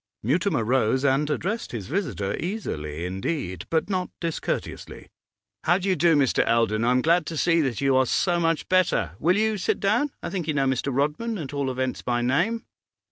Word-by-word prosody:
Mutimer 155 Hz, -, +1 dB
rose 130 Hz, +2 st, +1 dB
and 140 Hz, +2 st, +2 dB
addressed 195 Hz, +10 st, -2 dB
his 110 Hz, -5 st, -4 dB
visitor 130 Hz, -, -2 dB
easily 85 Hz, -, -4 dB
indeed, 95 Hz, -, -3 dB
but 160 Hz, -1 st, +1 dB
not 185 Hz, -2 st, -1 dB
discourteously. 165 Hz, -2 st, -4 dB, 0.6 s
'How 175 Hz, +2 st, +4 dB
do 195 Hz, +1 st, -2 dB
you 185 Hz, -, +3 dB
do, 170 Hz, 0 st, +4 dB
Mr. 140 Hz, -3 st, +3 dB
Eldon? 115 Hz, -1 st, +1 dB
I'm 125 Hz, +2 st, +2 dB
glad 170 Hz, 0 st, +3 dB
to 165 Hz, -, -4 dB
see 165 Hz, +1 st, +3 dB
that 130 Hz, -6 st, -1 dB
you 135 Hz, -1 st, +3 dB
are 130 Hz, -1 st, +3 dB
so 175 Hz, +5 st, +1 dB
much 165 Hz, -1 st, 0 dB
better. 185 Hz, -, +2 dB
Will 175 Hz, +5 st, +3 dB
you 215 Hz, -1 st, +1 dB
sit -, -, 0 dB
down? 220 Hz, +9 st, +2 dB
I -, -, -4 dB
think 180 Hz, -5 st, -3 dB
you 155 Hz, -, 0 dB
know 135 Hz, -1 st, +2 dB
Mr. 130 Hz, +1 st, 0 dB
Rodman, 150 Hz, -, -1 dB
at 145 Hz, -5 st, -6 dB
all 140 Hz, -2 st, -1 dB
events 130 Hz, 0 st, -2 dB
by 120 Hz, -1 st, -1 dB
name? 175 Hz, -, +1 dB
150 Hz, 190 wpm, -25 LUFS, 125-180 Hz, 0.6 s, How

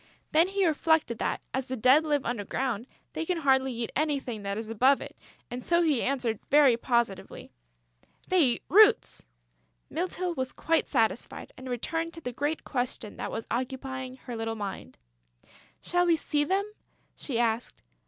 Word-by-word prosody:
Then 325 Hz, +3 st, +5 dB
he 390 Hz, 0 st, +1 dB
reflected 315 Hz, -6 st, +2 dB
that, -, -, -1 dB
as 265 Hz, 0 st, -2 dB
the 260 Hz, -, -3 dB
Dead 255 Hz, +6 st, +5 dB
live 295 Hz, -3 st, 0 dB
under 235 Hz, -3 st, -2 dB
ground, 240 Hz, +1 st, -2 dB, 0.3 s
they -, -, -2 dB
can 355 Hz, +1 st, -1 dB
hardly 265 Hz, -3 st, +3 dB
eat 235 Hz, -1 st, -4 dB
anything 275 Hz, -7 st, -1 dB
that 200 Hz, 0 st, -3 dB
is 220 Hz, 0 st, -5 dB
above 260 Hz, +5 st, +4 dB
it; -, -, -9 dB, 0.4 s
and 245 Hz, +1 st, -5 dB
so 340 Hz, 0 st, +3 dB
he 300 Hz, -7 st, +2 dB
answered 245 Hz, -5 st, -1 dB
very 285 Hz, -4 st, +6 dB
positively: 235 Hz, -4 st, -2 dB, 0.8 s
"They 370 Hz, -, +3 dB
eat 250 Hz, -5 st, +2 dB
roots!" 415 Hz, -, +5 dB, 0.6 s
Mytyl 360 Hz, +1 st, -2 dB
was 260 Hz, -4 st, -3 dB
quite 330 Hz, 0 st, +1 dB
satisfied 230 Hz, -3 st, -1 dB
and 260 Hz, 0 st, -9 dB
returned 325 Hz, +7 st, -2 dB
to 330 Hz, -, -9 dB
the 250 Hz, -4 st, -5 dB
great 290 Hz, +5 st, -2 dB
question 245 Hz, -5 st, -3 dB
that -, -, -4 dB
was 225 Hz, -, -4 dB
occupying 260 Hz, +1 st, -4 dB
her 250 Hz, -2 st, -8 dB
little 225 Hz, 0 st, -3 dB
mind: 200 Hz, -3 st, -6 dB, 0.8 s
"Shall 355 Hz, 0 st, +1 dB
we 335 Hz, -, +5 dB
see 295 Hz, -1 st, 0 dB
them?" 385 Hz, +5 st, +1 dB, 0.5 s
she 260 Hz, -6 st, -3 dB
asked. 230 Hz, 0 st, -1 dB
260 Hz, 165 wpm, -28 LUFS, 235-320 Hz, 0.8 s, very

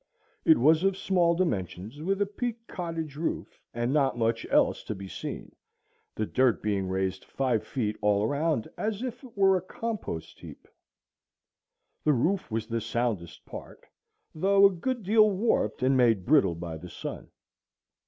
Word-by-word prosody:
It 320 Hz, -2 st, +7 dB
was 160 Hz, +2 st, +4 dB
of 195 Hz, -1 st, +2 dB
small 175 Hz, -3 st, +2 dB
dimensions, 105 Hz, -, -2 dB
with 195 Hz, +4 st, +1 dB
a -, -, -2 dB
peaked 230 Hz, +2 st, -5 dB
cottage 165 Hz, -4 st, -5 dB
roof, 165 Hz, -, -4 dB
and 120 Hz, +3 st, -1 dB
not 135 Hz, -4 st, +2 dB
much 115 Hz, 0 st, 0 dB
else -, -, +3 dB
to 110 Hz, -, -4 dB
be 95 Hz, 0 st, -8 dB
seen, -, -, -7 dB, 0.6 s
the 110 Hz, -, -1 dB
dirt 130 Hz, +1 st, +2 dB
being 100 Hz, -3 st, 0 dB
raised 95 Hz, 0 st, -1 dB
five 125 Hz, -5 st, -1 dB
feet 110 Hz, -5 st, -2 dB
all 105 Hz, -1 st, +3 dB
around 145 Hz, -1 st, 0 dB
as 215 Hz, +1 st, -2 dB
if 250 Hz, +1 st, -5 dB
it 245 Hz, -5 st, -14 dB
were 195 Hz, -1 st, +5 dB
a 185 Hz, -, 0 dB
compost 205 Hz, -, -5 dB
heap. -, -, -12 dB, 1.4 s
The 150 Hz, -, +4 dB
roof 170 Hz, +10 st, 0 dB
was 110 Hz, -1 st, -2 dB
the 115 Hz, 0 st, -2 dB
soundest 110 Hz, -7 st, -3 dB
part, -, -, -10 dB, 0.5 s
though 195 Hz, +4 st, +4 dB
a 200 Hz, -, +7 dB
good 235 Hz, +6 st, -3 dB
deal 215 Hz, +2 st, +5 dB
warped 190 Hz, -, 0 dB
and 135 Hz, +1 st, +4 dB
made 115 Hz, -7 st, +3 dB
brittle 125 Hz, -, +4 dB
by 85 Hz, -1 st, -6 dB
the 90 Hz, +3 st, -10 dB
sun. -, -, -7 dB
140 Hz, 165 wpm, -28 LUFS, -, 1.4 s, It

